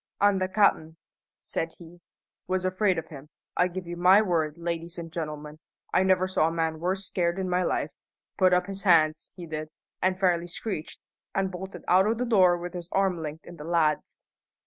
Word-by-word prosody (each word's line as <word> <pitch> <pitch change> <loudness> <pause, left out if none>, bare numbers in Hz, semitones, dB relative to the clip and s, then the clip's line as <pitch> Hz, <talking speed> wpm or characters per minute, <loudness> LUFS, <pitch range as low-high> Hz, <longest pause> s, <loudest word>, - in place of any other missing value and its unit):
"An' 200 -1 +4
the 185 - 0
cap'n," 185 -5 +2 0.4
said 165 0 -3
he, 175 0 -14 0.5
"was 185 0 -1
afraid 185 0 +1
of 160 -1 -5
him. 145 -1 -11 0.3
I 180 - +3
give 185 0 -6
you 175 +1 -5
my 180 +3 +6
word, 165 -6 0
ladies 170 0 -4
and 165 -1 -7
gentlemen, 150 -2 -5 0.3
I - - +4
never 185 0 +3
saw 175 -4 +2
a - - -1
man 160 -1 -1
worse 190 +3 -1
scared 175 -1 0
in 190 -1 -2
my 180 0 +1
life. - - -1 0.4
Put 185 -1 +4
up 180 0 +3
his 195 0 -6
hands, 160 -5 +3
he 175 - -8
did, 155 -1 -5 0.3
an' 185 0 +2
fairly 175 -2 +1
screeched, 175 -2 -5 0.3
an' 195 0 +1
bolted 190 +1 -8
out 190 +2 +5
o' 225 - +2
the 250 +2 -2
door 185 -7 +5
with 175 +1 -6
his 175 -1 -6
arm 190 -3 +1
linked 155 0 -6
in 175 - -11
the 150 - -8
lad's." 160 -2 0
175 Hz, 200 wpm, -27 LUFS, 165-185 Hz, 0.5 s, my